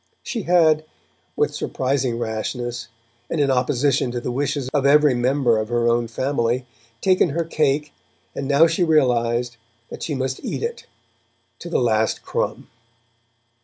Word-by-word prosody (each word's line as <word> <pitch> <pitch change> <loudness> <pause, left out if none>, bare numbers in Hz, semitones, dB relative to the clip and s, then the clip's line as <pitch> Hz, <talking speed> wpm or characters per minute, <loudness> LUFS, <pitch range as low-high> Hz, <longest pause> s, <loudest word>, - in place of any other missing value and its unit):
She 235 - -3
had, 160 -3 +4 0.5
with - - +1
surprising 130 -2 -1
rashness, 120 +1 -4 0.4
and 165 - -2
in 140 -2 +3
opposition 130 0 +1
to 120 0 -3
the 120 - -4
wishes 140 +1 -2
of 145 -2 +2
every 145 0 +5
member 125 -1 +2
of 110 0 -3
her 120 -1 +1
own 120 0 +2
family, 125 0 -1 0.4
taken 185 -2 +3
her 165 +4 -1
cake, 150 -2 0 0.4
and 135 - -4
now 145 +3 +5
she 165 +2 +1
recognized 120 -6 +1 0.3
that - - -8
she 150 - -3
must 130 0 -3
eat - - -4
it, 470 +1 -5 0.7
to 175 - -8
the - - +1
last 110 -3 +1
crumb. - - -3
130 Hz, 150 wpm, -22 LUFS, 120-150 Hz, 0.7 s, every